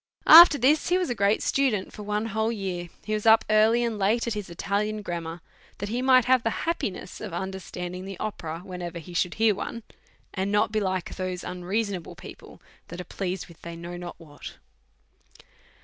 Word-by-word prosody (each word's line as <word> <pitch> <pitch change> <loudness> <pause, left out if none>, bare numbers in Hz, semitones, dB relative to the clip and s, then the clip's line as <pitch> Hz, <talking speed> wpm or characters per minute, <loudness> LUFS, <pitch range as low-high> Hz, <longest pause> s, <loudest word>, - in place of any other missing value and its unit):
After 330 -1 +10
this, 290 +6 +3
he 360 - +3
was 360 -8 -1
a - - +1
great 200 -1 +1
student 250 -8 0
for - - -9
one 210 +1 -2
whole 220 +1 0
year; 185 -5 -4
he 215 - -3
was 215 +1 -1
up 220 0 +6
early 220 +3 +4
and 230 -3 -2
late 215 +5 +1
at 235 - -2
his 210 -3 -5
Italian 210 +4 -2
grammar, 170 -2 -5 0.4
that 205 - -5
he 240 +3 -2
might 255 -2 +5
have 255 0 +4
the 225 -1 -2
happiness 275 - -3
of 210 -6 -6
understanding 185 -1 -6
the 195 -1 -8
opera, 165 -6 -5
whenever 175 -2 -6
he 170 +2 -10
should 175 +1 0
hear 220 -1 +3
one, 230 +3 -6 0.5
and 195 0 -2
not 210 0 +2
be 215 - +1
like 185 -3 -3
those 185 -1 -4
unreasonable 185 +1 -3
people - - -12 0.3
that 175 - -9
are - - -4
pleased 185 0 -4
with 170 - -17
they 170 0 -8
do 170 +1 -7
not 175 -1 -8
know 165 - -13
what. 145 -1 -10
200 Hz, 195 wpm, -26 LUFS, 180-225 Hz, 0.5 s, After